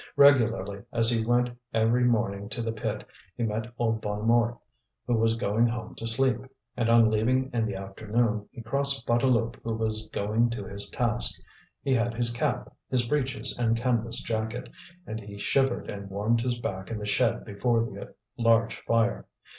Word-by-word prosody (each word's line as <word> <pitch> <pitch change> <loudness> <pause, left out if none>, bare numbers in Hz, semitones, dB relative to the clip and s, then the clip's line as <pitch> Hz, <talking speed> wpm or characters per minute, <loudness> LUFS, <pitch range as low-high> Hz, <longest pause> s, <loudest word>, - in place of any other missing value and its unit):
Regularly 115 -8 +4
as 115 0 +7
he 115 -1 +2
went 120 +1 +2 0.2
every 115 +2 +3
morning 100 -4 0
to 115 +1 -3
the 115 - -1
pit, 110 -1 -4 0.3
he 120 - -1
met 110 +1 -2
old 110 -2 0
Bonnemort 115 +3 +1 0.5
who 120 - 0
was 115 0 +2
going 115 0 +2
home 115 -2 -4
to 115 - -3
sleep, 130 +3 +3 0.4
and 120 -2 0
on 115 -1 +6
leaving 130 +5 +1
in 115 -2 +1
the 100 - -4
afternoon 105 +2 -1
he 115 - -9
crossed 140 +1 0
Bouteloup 120 -1 +2
who 115 -1 -2
was 110 -1 -2
going 110 +4 +1
to 115 - -4
his 100 -1 -4
task. 120 -1 -1 0.4
He 135 - +1
had 120 -1 +1
his 120 0 +1
cap, 120 - -2
his 125 -2 +1
breeches 135 -1 -1
and 115 -1 +2
canvas 115 -1 0
jacket, 110 +1 -3 0.4
and 110 - -5
he 100 -1 -10
shivered 135 +4 +1
and 100 -1 -6
warmed 105 +4 +1
his 120 0 -1
back 95 -5 -5
in 115 - -3
the 105 - -5
shed 110 +3 +1
before 115 +3 +1
the - - -9 0.2
large 115 -1 +3
fire. 115 0 0
115 Hz, 175 wpm, -27 LUFS, 110-120 Hz, 0.5 s, as